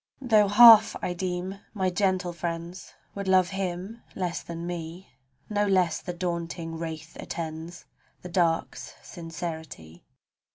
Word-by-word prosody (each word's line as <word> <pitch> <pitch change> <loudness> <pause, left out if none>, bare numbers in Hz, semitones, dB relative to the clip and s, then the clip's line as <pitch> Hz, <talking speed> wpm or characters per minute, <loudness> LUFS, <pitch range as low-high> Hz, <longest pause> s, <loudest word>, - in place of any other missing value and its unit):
Tho' 220 -6 +4
half 225 +1 +8
I 180 - -1
deem 185 +2 -4 0.2
my 190 -2 0
gentle 185 -2 0
friends 170 +1 -6 0.2
Would 200 -1 -5
love 185 -2 +4
him 190 +3 -4
less 180 -3 -2
than 170 0 -7
me, 175 +1 -7 0.4
No 205 -1 0
less 180 -4 +2
the - - -5
daunting 170 -2 -4
wraith 160 -1 -7
attends 165 +1 -6 0.4
The 180 - -7
dark's 170 -2 -1
sincerity. 160 - -8
175 Hz, 125 wpm, -27 LUFS, 165-190 Hz, 0.4 s, half